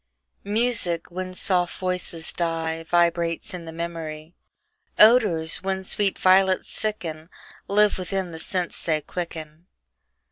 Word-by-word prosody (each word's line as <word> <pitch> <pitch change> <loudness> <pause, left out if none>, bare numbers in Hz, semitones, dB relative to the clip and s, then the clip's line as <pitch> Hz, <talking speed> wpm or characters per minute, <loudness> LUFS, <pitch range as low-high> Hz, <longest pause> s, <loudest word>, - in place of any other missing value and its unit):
MUSIC, 205 -6 +1
when 185 +1 -5
soft 180 -2 +1
voices 180 -3 -3
die, 165 -1 -2
Vibrates 170 -1 +1
in 175 -2 -7
the 165 - -7
memory 165 -1 -6 0.6
Odors, 210 -8 +5
when 190 0 -2
sweet 195 +1 0
violets 190 0 +3
sicken, 165 -7 -4 0.4
Live 210 0 +3
within 185 -1 -3
the 160 - -7
sense 180 0 -2
they 155 -2 +1
quicken. 160 -1 -7
175 Hz, 115 wpm, -24 LUFS, 165-190 Hz, 0.6 s, Odors